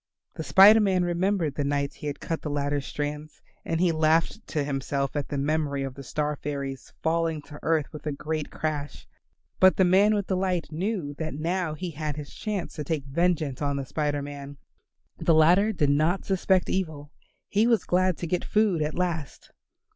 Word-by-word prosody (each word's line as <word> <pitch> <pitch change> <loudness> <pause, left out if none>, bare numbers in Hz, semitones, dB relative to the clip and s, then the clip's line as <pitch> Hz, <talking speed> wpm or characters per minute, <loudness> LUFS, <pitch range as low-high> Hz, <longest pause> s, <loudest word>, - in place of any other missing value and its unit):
The 160 - -5
Spider 205 +6 +8
Man 190 -4 +2
remembered 175 -2 0
the 145 - -2
nights 140 0 -1
he 150 - -6
had 145 - -4
cut 165 - -3
the 150 - -4
ladder 145 0 -1
strands, 150 +2 -5 0.2
and 165 - -2
he 180 -1 +3
laughed 160 +6 +1
to 150 -3 -1
himself 140 0 -2
at 145 - -2
the 145 - -3
memory 145 -1 0
of 135 -1 -4
the 140 - -10
star 150 +3 -2
fairies 140 -2 -5
falling 165 -1 +1
to 145 0 -11
earth 160 -2 +1
with 155 0 -8
a - - 0
great 155 +2 -3
crash. 150 -2 -4 0.5
But 185 0 +6
the 190 - +5
man 200 +4 +5
with 205 -2 -1
the 190 - -1
light 185 -3 -1
knew 175 -2 -2
that 155 -3 -3
now 165 +1 -1
he 175 +2 -5
had 150 -1 -4
his 150 -1 -8
chance 210 -5 -4
to 150 - -3
take 145 -1 -2
vengeance 155 -2 0
on 140 -1 0
the 140 -1 -3
Spider 145 0 -1
Man. 140 0 -8 0.6
The 165 - +3
latter 180 +7 +5
did 150 -8 +1
not 155 +6 +1
suspect 190 -1 +2
evil. 155 -6 -3 0.4
He 215 +3 +2
was 230 -5 +3
glad 185 -1 +1
to - - -4
get 175 +1 -1
food 210 -6 +2
at 150 0 -1
last. 170 -5 -3
155 Hz, 195 wpm, -26 LUFS, 145-180 Hz, 0.6 s, Spider